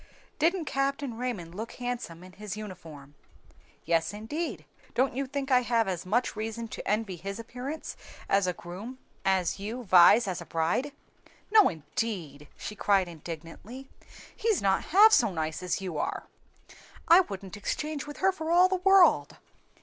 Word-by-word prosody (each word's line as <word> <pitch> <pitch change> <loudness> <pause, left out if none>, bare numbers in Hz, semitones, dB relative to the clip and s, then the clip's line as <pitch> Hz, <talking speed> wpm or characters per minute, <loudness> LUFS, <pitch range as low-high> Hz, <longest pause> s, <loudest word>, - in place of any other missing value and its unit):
"Didn't 335 +2 +2
Captain 275 -2 -1
Raymond 225 -9 -4
look 220 +5 -6
handsome 245 -9 -5
in 185 - -12
his 210 +2 -7
uniform?" 165 -9 -10 0.7
"Yes, 165 +3 +1
indeed; 295 +11 -4 0.3
don't 260 +2 +2
you 270 +2 -2
think 275 0 -4
I 250 -1 +6
have 230 -3 +1
as 180 -1 -3
much 235 +6 0
reason 225 +2 -4
to - - -7
envy 210 -3 -1
his 195 +4 -6
appearance 250 +6 -6 0.3
as 195 -1 +2
a 180 - 0
groom 190 +10 -9 0.3
as 190 -1 +1
you 225 +5 -5
Vi's 190 +3 +6
as 180 -2 -3
a - - -8
bride?" 170 - 0 0.6
"No, 425 -2 +7
indeed!" 155 -2 -5
she 210 - -6
cried 195 -3 +2
indignantly, 170 - -9 0.5
"he's 445 -3 +1
not 195 -1 +1
half 415 +6 +7
so 230 - +4
nice 160 -1 -3
as 180 +1 -2
you 180 -6 -4
are! - - -2 0.8
I 335 +2 +8
wouldn't 195 - -4
exchange 295 +8 -3
with 295 - -8
her 385 0 +4
for 320 -4 -6
all 355 +2 +6
the 375 0 0
world!" 385 0 +4
215 Hz, 160 wpm, -28 LUFS, 180-275 Hz, 0.8 s, I